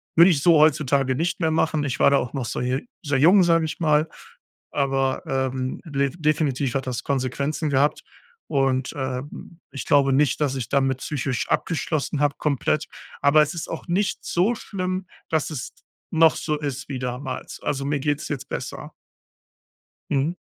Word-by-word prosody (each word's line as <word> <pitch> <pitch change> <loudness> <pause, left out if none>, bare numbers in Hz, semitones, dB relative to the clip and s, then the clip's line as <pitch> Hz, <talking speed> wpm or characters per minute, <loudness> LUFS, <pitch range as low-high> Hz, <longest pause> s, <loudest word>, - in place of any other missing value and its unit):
Würde 170 +3 +8
ich 145 -5 +1
so 170 0 +6
heutzutage 140 -3 +3
nicht 175 +6 -1
mehr 160 -1 +2
machen. 155 -1 +1
Ich 135 -3 -3
war - - +6
da 140 - +5
auch 125 -2 -2
noch 135 -4 -3
so - - -3
sehr 140 - -2
jung, 180 +7 +6
sage 165 -2 +3
ich 155 - -5
mal, 155 -1 +3 0.6
aber 135 -2 0
ähm, 130 -1 -2
def 140 -3 -1
definitiv 145 -4 0
hat 135 -1 -2
das 125 -2 -3
Konsequenzen 140 +3 -1
gehabt 140 +2 +2 0.4
und 135 -2 0
ähm, 130 +5 -5
ich 140 - -6
glaube 140 -3 +4
nicht, 145 +1 +2
dass 140 -3 +1
ich 130 -4 -4
damit 135 -2 +1
psychisch 135 -2 -2
abgeschlossen 155 -3 -1
hab, 145 -1 +1
komplett, 150 +1 0 0.3
aber 140 +2 +6
es 150 - -4
ist 165 - -5
auch 165 - -6
nicht 185 +1 0
so 185 +7 +2
schlimm, 185 -3 -4 0.2
dass 160 -3 0
es 140 -6 -5 0.4
noch 160 0 +5
so 155 -1 -1
ist 140 -2 -4
wie 135 -3 -4
damals. 125 +1 -5
Also 140 -1 -2
mir 145 0 0
geht's 145 +1 -1
jetzt 145 -4 -4
besser. - - -6 1.2
Mhm. 145 +6 0
145 Hz, 170 wpm, -23 LUFS, 135-160 Hz, 1.2 s, Würde